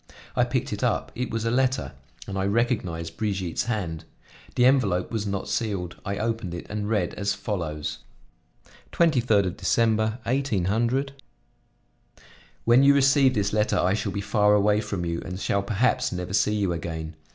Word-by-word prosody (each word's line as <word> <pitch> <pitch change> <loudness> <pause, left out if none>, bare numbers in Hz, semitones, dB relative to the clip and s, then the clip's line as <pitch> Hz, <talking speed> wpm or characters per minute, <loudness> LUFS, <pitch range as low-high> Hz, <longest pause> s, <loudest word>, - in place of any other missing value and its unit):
I - - +3
picked - - -2
it - - -4
up; - - 0
it 125 0 -3
was 115 0 -3
a 115 - +1
letter, 130 +1 +1 0.3
and 100 - -6
I 95 0 0
recognized 95 -8 -1
Brigitte's 95 -6 -2
hand. 95 -9 -3 0.5
The 125 - +4
envelope 110 -9 +2
was 110 -3 -2
not 100 -1 -3
sealed. 95 -6 -2
I 100 0 -3
opened 110 -5 -2
it 85 - -7
and 105 -1 -3
read 105 -6 0
as 100 0 -1
follows: 85 -8 -4 0.9
23 120 - +3
December, 110 +2 +1
18 130 -7 0 2.0
"When 120 +3 +6
you 140 +1 +6
receive 135 -1 +4
this 100 -1 0
letter 105 0 +2
I 90 +2 +2
shall 105 -1 -2
be 100 - -3
far 105 0 +3
away 105 +1 +3
from 100 -4 -3
you, 85 0 -2
and 90 0 -6
shall 100 0 0
perhaps 105 +5 +1
never 90 0 -4
see 105 +1 +2
you 100 -4 0
again. 80 -1 -5
105 Hz, 165 wpm, -25 LUFS, 90-115 Hz, 2.0 s, When